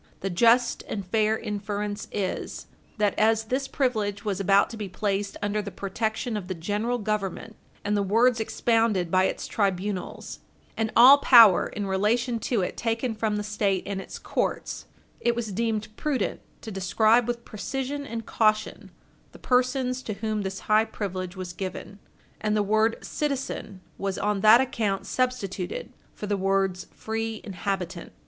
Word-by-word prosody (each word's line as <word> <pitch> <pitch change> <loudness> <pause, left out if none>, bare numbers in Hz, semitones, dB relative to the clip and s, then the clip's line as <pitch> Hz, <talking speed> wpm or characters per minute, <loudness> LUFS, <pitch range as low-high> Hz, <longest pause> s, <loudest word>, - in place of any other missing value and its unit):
The 195 - -2
just 235 +6 +4
and 200 -3 -4
fair 215 +3 +1
inference 205 0 -4
is 190 -3 -3 0.3
that 210 -2 +2
as 220 +1 +3
this 260 +5 -2
privilege 215 -8 -1
was 200 -2 -1
about 195 0 +3
to - - -6
be 205 -3 -5
placed 200 +1 -2
under 205 +1 0
the 205 - -6
protection 220 +4 -3
of 200 -4 -4
the 185 - -3
General 210 +8 -1
Government, 215 0 -3 0.3
and 205 +1 +1
the 205 - +2
words 225 +5 +3
expounded 220 -5 +1
by 185 0 +4
its - - -2
tribunals, 195 -1 -2 0.4
and 220 -1 -1
all 260 +4 +9
power 230 -9 +7
in 205 - -4
relation 225 +5 +1
to 225 -2 0
it - - -4
taken 230 +1 -1
from 215 -1 -1
the 210 - -2
State 205 -3 0
and 195 -1 -3
its - - -9
courts, - - -3 0.3
it 235 0 +1
was 230 -3 -3
deemed 215 0 -2
prudent 295 -4 -1 0.2
to 220 - -7
describe 215 +5 +3
with 240 -1 -3
precision 270 +6 -4
and 230 -5 -6
caution 215 -2 0 0.4
the - - -12
persons 255 0 +1
to 220 - -4
whom 215 +1 -2
this 190 -1 -4
high 215 +1 +4
privilege 185 -4 -5
was 185 -1 -6
given 190 +2 -6 0.4
and 215 0 0
the 210 - +2
word 220 +2 +2
citizen 275 -9 -3 0.2
was 195 -1 -2
on 210 0 0
that 220 +4 +8
account 205 -6 -1
substituted 200 -7 -2 0.2
for - - -6
the 205 -1 0
words 195 -1 0
free 225 0 -4
inhabitant. 185 -3 -4
215 Hz, 160 wpm, -26 LUFS, 195-230 Hz, 0.4 s, all